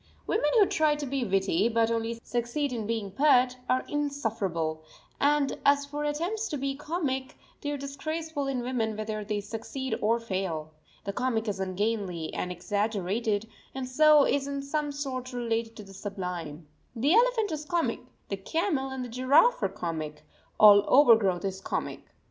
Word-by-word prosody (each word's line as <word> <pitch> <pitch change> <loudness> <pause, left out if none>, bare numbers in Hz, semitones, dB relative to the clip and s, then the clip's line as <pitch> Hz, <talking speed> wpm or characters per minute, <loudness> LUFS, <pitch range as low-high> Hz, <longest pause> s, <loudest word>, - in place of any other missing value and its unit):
Women 295 - +1
who 415 - +7
try 310 -4 +2
to 295 -1 -4
be 270 -1 -1
witty, 195 0 +1
but 230 0 +2
only 230 0 -2
succeed 245 +4 -2
in 220 -3 -3
being 220 -4 -2
pert, 255 -1 +4
are 255 0 +2
insufferable; 210 - -2 0.4
and 285 -1 +2
as 280 0 +4
for 295 +1 -4
attempts 345 +10 -1
to 295 - -3
be 275 0 -2
comic 285 -3 -3 0.2
they 290 - -3
are 290 - -2
disgraceful 290 +2 -4
in 260 -3 -2
women 225 -4 -1
whether 215 0 -3
they 205 0 -2
succeed 230 +6 -5
or 230 +2 +2
fail. 185 -8 -3 0.3
The 200 - -4
comic 235 -1 -1
is 200 -2 -2
ungainly 190 -3 -2
and 180 - -3
exaggerated, 205 +3 -1 0.3
and 265 -1 -3
so 300 +2 +6
is 280 0 0
in 280 0 -3
some 295 +1 -2
sort 260 -3 -5
related 230 -2 -2
to 210 - -9
the 195 -1 -13
sublime. 180 -6 -5 0.3
The 275 +8 +2
elephant 460 -3 +3
is 305 -1 -3
comic, 335 +2 0 0.3
the 195 - -2
camel 295 - -1
and 265 -1 -4
the - - -8
giraffe 275 - +4
are - - +1
comic, 155 -3 -5 0.3
all 205 -1 +9
overgrowth 220 -10 +5
is 190 0 -3
comic. - - -4
245 Hz, 165 wpm, -28 LUFS, 205-285 Hz, 0.4 s, all